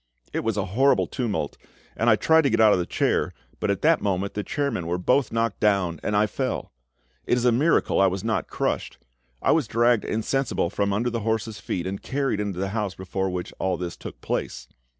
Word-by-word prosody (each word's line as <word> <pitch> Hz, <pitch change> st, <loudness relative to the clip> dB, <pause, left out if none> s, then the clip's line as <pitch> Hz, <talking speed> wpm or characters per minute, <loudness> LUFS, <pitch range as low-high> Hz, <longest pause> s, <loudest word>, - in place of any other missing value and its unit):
It -, -, 0 dB
was 110 Hz, -2 st, -1 dB
a 100 Hz, -, 0 dB
horrible 135 Hz, +4 st, +4 dB
tumult, 110 Hz, -, -3 dB, 0.4 s
and 115 Hz, -, +2 dB
I 110 Hz, -, +7 dB
tried 160 Hz, +10 st, +4 dB
to -, -, +4 dB
get -, -, +1 dB
out 110 Hz, -2 st, +7 dB
of -, -, +2 dB
the 85 Hz, -, -2 dB
chair, -, -, 0 dB, 0.2 s
but -, -, -1 dB
at -, -, -1 dB
that -, -, +4 dB
moment 100 Hz, 0 st, -1 dB
the 105 Hz, -, -3 dB
chairmen 130 Hz, -, -2 dB
were 90 Hz, +1 st, 0 dB
both 125 Hz, +9 st, +2 dB
knocked 115 Hz, -2 st, -1 dB
down, 95 Hz, -6 st, +1 dB
and 105 Hz, -, 0 dB
I 105 Hz, -, +4 dB
fell. 105 Hz, -, -3 dB, 0.6 s
It 125 Hz, -, +3 dB
is 125 Hz, -, 0 dB
a 125 Hz, -, +5 dB
miracle 140 Hz, -2 st, +2 dB
I 95 Hz, -, +6 dB
was 95 Hz, +1 st, -2 dB
not 110 Hz, 0 st, -1 dB
crushed. -, -, -2 dB, 0.5 s
I -, -, +4 dB
was 155 Hz, -7 st, +2 dB
dragged 120 Hz, 0 st, +3 dB
insensible 115 Hz, -4 st, -1 dB
from 100 Hz, 0 st, 0 dB
under 115 Hz, +5 st, 0 dB
the 115 Hz, -, -2 dB
horses' 110 Hz, 0 st, -2 dB
feet 90 Hz, -, -3 dB
and 95 Hz, +1 st, -4 dB
carried 135 Hz, -5 st, -1 dB
into 100 Hz, -3 st, -3 dB
the 95 Hz, +1 st, -1 dB
house 105 Hz, -3 st, -2 dB
before 95 Hz, +1 st, -3 dB
which 90 Hz, -1 st, -4 dB
all 95 Hz, -2 st, 0 dB
this 85 Hz, -1 st, -5 dB
took -, -, -9 dB
place. -, -, -3 dB
105 Hz, 220 wpm, -25 LUFS, 95-120 Hz, 0.6 s, I